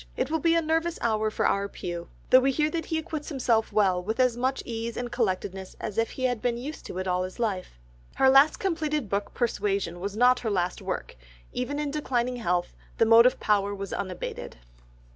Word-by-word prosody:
"It 255 +3 -1
will 320 - +1
be 330 +2 +3
a 335 - +2
nervous 325 +2 0
hour 220 -2 +1
for - - -1
our 200 0 +1
pew, 175 -2 -6 0.2
though 255 - +9
we 265 +1 +2
hear 300 +3 +1
that 330 0 -3
he 320 - -1
acquits 315 -2 -5
himself 245 -6 +1
with 200 +2 +1
as 250 -2 +3
much 260 +2 -1
ease 230 0 -4
and 245 -1 -4
collectedness 190 -4 -2
as 215 - -3
if 225 - +1
he 260 - -6
had 245 -3 0
been 240 -1 0
used 285 +6 -7
to - - -7
it 185 0 -3
all 180 0 +1
his 185 0 -5
life." 195 - -3 0.4
Her 265 - +4
last 275 +3 +6
completed 305 - -1
book 200 0 -2
Persuasion 200 -7 -1
was 200 +3 -4
not 250 +1 +5
her 225 - -2
last 180 -3 -1
work, - - -4 0.4
even 250 +4 -2
in 295 -1 -2
declining 250 -4 -1
strength 175 -4 0 0.2
the 225 - +4
motive 230 +3 +6
power 205 -1 +1
was 195 -1 -6
unabated. 185 - -5
235 Hz, 205 wpm, -27 LUFS, 200-270 Hz, 0.4 s, though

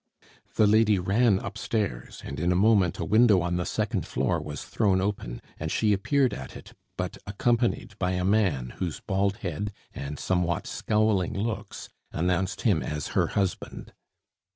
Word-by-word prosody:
The 110 - +5
lady 105 0 +4
ran 100 +4 +3
upstairs, 100 - -3
and 70 - -6
in 85 +2 +1
a - - +2
moment 100 -3 +4
a - - -3
window 110 -2 +5
on 85 0 -1
the 90 - -2
second - - -1
floor 65 +1 0
was 75 -1 -6
thrown 100 -4 +1
open, 95 -12 -3 0.2
and 80 0 -3
she 105 -2 +2
appeared 130 +7 +2
at 65 - -7
it, - - -13 0.2
but - - -4
accompanied 120 +4 0
by 90 -1 0
a 90 0 -1
man 90 - +1
whose 90 -4 -3
baldhead 100 -1 -1 0.2
and 70 +1 -5
somewhat 90 0 0
scowling 105 -4 +1
looks 110 +2 -4 0.2
announced 90 +3 0
him 100 -10 +3
as 75 +3 -4
her - - +2
husband. 95 -3 -2
95 Hz, 155 wpm, -27 LUFS, 85-105 Hz, 0.2 s, The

